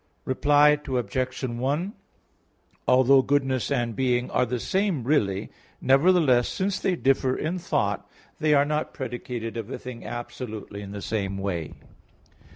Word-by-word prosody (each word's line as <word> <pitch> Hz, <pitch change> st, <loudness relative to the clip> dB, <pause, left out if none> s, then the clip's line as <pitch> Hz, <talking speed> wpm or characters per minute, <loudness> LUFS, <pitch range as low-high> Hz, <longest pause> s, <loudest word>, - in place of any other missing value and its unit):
Reply 145 Hz, +2 st, +4 dB
Obj. 130 Hz, +1 st, -2 dB
1: 135 Hz, -, -1 dB, 0.9 s
Although 130 Hz, +1 st, +6 dB
goodness 135 Hz, -2 st, 0 dB
and 120 Hz, -5 st, -1 dB
being 125 Hz, -1 st, 0 dB
are 125 Hz, -, +2 dB
the 125 Hz, +1 st, -2 dB
same 190 Hz, -, 0 dB
really, 105 Hz, -8 st, 0 dB, 0.3 s
nevertheless 135 Hz, -3 st, +4 dB
since 190 Hz, 0 st, -1 dB
they 185 Hz, -, +1 dB
differ 130 Hz, -3 st, +1 dB
in 170 Hz, +4 st, -2 dB
thought, 100 Hz, -, -1 dB, 0.3 s
they 155 Hz, -2 st, +3 dB
are 140 Hz, 0 st, +4 dB
not 150 Hz, +1 st, -2 dB
predicated 120 Hz, -3 st, -5 dB
of 115 Hz, -1 st, -5 dB
a -, -, -4 dB
thing 125 Hz, -2 st, -9 dB
absolutely 120 Hz, -4 st, -6 dB
in 100 Hz, -1 st, -8 dB
the 100 Hz, -1 st, -6 dB
same 100 Hz, -3 st, -2 dB
way. 90 Hz, -6 st, -3 dB
130 Hz, 140 wpm, -25 LUFS, 115-145 Hz, 0.9 s, Although